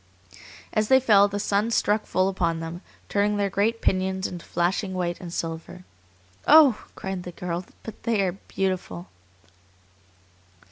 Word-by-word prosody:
As 215 Hz, -1 st, +1 dB
they 265 Hz, +2 st, +6 dB
fell 205 Hz, -6 st, +5 dB
the 205 Hz, 0 st, -4 dB
sun 205 Hz, +2 st, +1 dB
struck 215 Hz, -1 st, +1 dB
full 185 Hz, +1 st, +1 dB
upon 170 Hz, -4 st, -1 dB
them, 165 Hz, +2 st, -6 dB, 0.3 s
turning 205 Hz, +1 st, +1 dB
their 200 Hz, -1 st, 0 dB
great 220 Hz, +4 st, 0 dB
pinions 190 Hz, 0 st, 0 dB
into 175 Hz, -2 st, -5 dB
flashing 185 Hz, +3 st, -1 dB
white 175 Hz, -1 st, -2 dB
and 175 Hz, -2 st, -7 dB
silver. 165 Hz, +2 st, -5 dB, 0.6 s
"Oh!" 295 Hz, -7 st, +7 dB
cried 190 Hz, -1 st, -4 dB
the 180 Hz, -, -8 dB
girl, 175 Hz, +1 st, -4 dB, 0.2 s
"but 225 Hz, -, -9 dB
they 220 Hz, -4 st, +1 dB
are 185 Hz, -, +1 dB
beautiful!" 180 Hz, -, -4 dB
190 Hz, 145 wpm, -25 LUFS, 175-205 Hz, 0.6 s, Oh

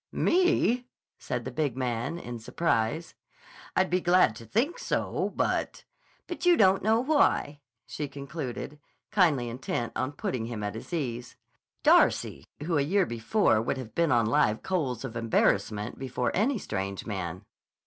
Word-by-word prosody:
"Me?" 340 Hz, -9 st, +2 dB, 0.3 s
said 120 Hz, -2 st, -4 dB
the 130 Hz, -, -4 dB
big 135 Hz, -1 st, -1 dB
man 125 Hz, +4 st, -2 dB
in 120 Hz, -7 st, -7 dB
surprise. 135 Hz, +3 st, -1 dB, 0.6 s
"I'd 185 Hz, -1 st, +2 dB
be 180 Hz, +1 st, +2 dB
glad 175 Hz, -10 st, +4 dB
to 115 Hz, -, -11 dB
think 265 Hz, -, 0 dB
so, -, -, -1 dB
but—" -, -, -1 dB, 0.4 s
"But 350 Hz, -, -7 dB
you 355 Hz, -1 st, +5 dB
don't 190 Hz, -1 st, +5 dB
know 220 Hz, +3 st, +3 dB
why," 255 Hz, -, +2 dB, 0.3 s
she 150 Hz, -, -4 dB
concluded, 140 Hz, 0 st, -6 dB, 0.3 s
kindly 155 Hz, -11 st, +3 dB
intent 120 Hz, -1 st, -3 dB
on 130 Hz, +3 st, -2 dB
putting 125 Hz, -4 st, -3 dB
him 115 Hz, -3 st, -5 dB
at 105 Hz, -, -2 dB
his 110 Hz, -, -9 dB
ease. 125 Hz, -7 st, -3 dB, 0.5 s
(Darcy, -, -, +4 dB, 0.2 s
who 165 Hz, -1 st, +1 dB
a -, -, +3 dB
year 185 Hz, +7 st, +2 dB
before 115 Hz, -, +2 dB
would 120 Hz, -, -2 dB
have 115 Hz, -5 st, -7 dB
been 170 Hz, +1 st, +2 dB
on 120 Hz, -2 st, +4 dB
live 110 Hz, 0 st, +2 dB
coals 135 Hz, -, -1 dB
of 120 Hz, -3 st, -7 dB
embarrassment 110 Hz, -1 st, 0 dB
before 125 Hz, -2 st, -2 dB
any 235 Hz, +7 st, +1 dB
strange 100 Hz, -, -4 dB
man!) 95 Hz, -3 st, -4 dB
135 Hz, 155 wpm, -28 LUFS, 115-180 Hz, 0.6 s, you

